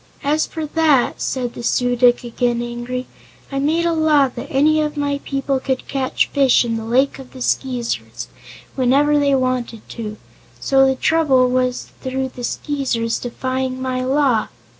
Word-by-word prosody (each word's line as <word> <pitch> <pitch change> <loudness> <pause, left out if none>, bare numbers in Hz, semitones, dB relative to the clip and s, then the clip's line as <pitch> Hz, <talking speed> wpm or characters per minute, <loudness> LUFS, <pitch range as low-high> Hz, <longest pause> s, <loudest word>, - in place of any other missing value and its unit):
"As 300 +2 +1
for 320 -1 -5
that," 300 -4 +2
said 250 -2 -2
the - - -8
Su 245 +1 +1
dic, 245 0 +4
again 240 0 -1
angry, 240 +1 -4 0.5
"I 275 - -1
made 320 +4 +1
a 340 - +2
law 305 -4 +3
that 240 - -8
any 310 +3 +3
of 300 0 -2
my 285 -1 -1
people 275 -1 -1
could 260 0 -3
catch 265 -2 0
fish 270 -3 +4
in 230 -1 -1
the 225 - -4
Lake 260 +5 +1
of 260 -1 -12
the 260 - -10
Skeezers, 250 -3 -2 0.5
whenever 280 +3 +3
they 280 -1 +3
wanted 255 -4 -2
to. 215 -2 -6 0.4
So 270 0 +4
the 265 - +1
trouble 265 -5 +3
was 255 0 -1
through 265 0 -2
the 250 -1 -10
Skeezers 245 -4 -2
defying 255 +1 -3
my 255 -1 -2
law." 260 -4 +2
260 Hz, 165 wpm, -19 LUFS, 245-280 Hz, 0.5 s, dic